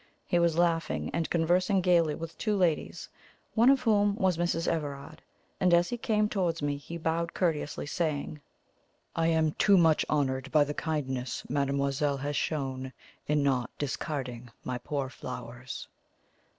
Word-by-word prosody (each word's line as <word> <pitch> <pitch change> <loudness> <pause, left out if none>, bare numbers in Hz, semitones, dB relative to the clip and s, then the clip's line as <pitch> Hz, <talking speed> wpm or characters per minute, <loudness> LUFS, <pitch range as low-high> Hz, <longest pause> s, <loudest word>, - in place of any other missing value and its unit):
He 175 - +2
was 170 -1 +2
laughing 170 -1 +1
and 165 -1 -1
conversing 180 +4 +2
gaily 170 -4 +3
with 165 0 -7
two 215 -2 +1
ladies, 175 -5 0 0.5
one 235 +3 +5
of 270 -1 +5
whom 205 -4 +3
was 190 -3 +2
Mrs. 165 -1 0
Everard; 145 -1 -3 0.4
and 180 -2 +5
as 175 0 +3
he 245 - -2
came 215 -2 +2
towards 180 -6 -1
me 145 -1 -1
he 165 +4 -7
bowed 165 +1 -1
courteously, 160 -6 -1
saying: 150 -1 -2 0.7
"I 165 0 +2
am 160 -1 +2
too 200 +5 +4
much 160 -3 +4
honoured 135 -2 0
by 150 -2 +5
the 145 0 -3
kindness 135 -6 -3
mademoiselle 140 0 0
has 145 +2 -3
shown 130 -3 -2 0.3
in 150 -1 +2
not 130 -3 +1
discarding 130 -4 -4
my 125 -1 -3
poor 140 +2 -3
flowers." 125 -1 -7
155 Hz, 150 wpm, -29 LUFS, 140-175 Hz, 0.7 s, one